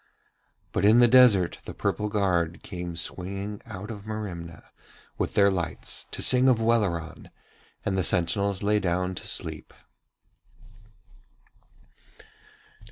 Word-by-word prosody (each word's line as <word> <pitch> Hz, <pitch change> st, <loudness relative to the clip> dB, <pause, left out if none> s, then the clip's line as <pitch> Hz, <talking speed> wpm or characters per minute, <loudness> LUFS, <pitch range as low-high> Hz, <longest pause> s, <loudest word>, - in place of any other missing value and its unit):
But -, -, -1 dB
in 105 Hz, +3 st, +6 dB
the 120 Hz, 0 st, +7 dB
desert 115 Hz, -8 st, +5 dB
the -, -, -8 dB
purple 105 Hz, 0 st, -1 dB
guard 90 Hz, -5 st, 0 dB
came 90 Hz, -3 st, -6 dB
swinging 100 Hz, +4 st, -5 dB
out 95 Hz, +4 st, -7 dB
of 105 Hz, -2 st, -8 dB
Merimna 90 Hz, -6 st, -7 dB, 0.6 s
with -, -, -2 dB
their 100 Hz, -1 st, +5 dB
lights 85 Hz, -4 st, -4 dB
to -, -, -1 dB
sing 130 Hz, +1 st, +5 dB
of 120 Hz, -3 st, +3 dB
Welleran, 100 Hz, -9 st, -1 dB, 0.6 s
and 95 Hz, -, 0 dB
the 95 Hz, -, +1 dB
sentinels 95 Hz, +3 st, +1 dB
lay 105 Hz, +1 st, +2 dB
down 90 Hz, 0 st, -1 dB
to -, -, -5 dB
sleep. -, -, -5 dB
100 Hz, 120 wpm, -26 LUFS, 90-105 Hz, 0.6 s, the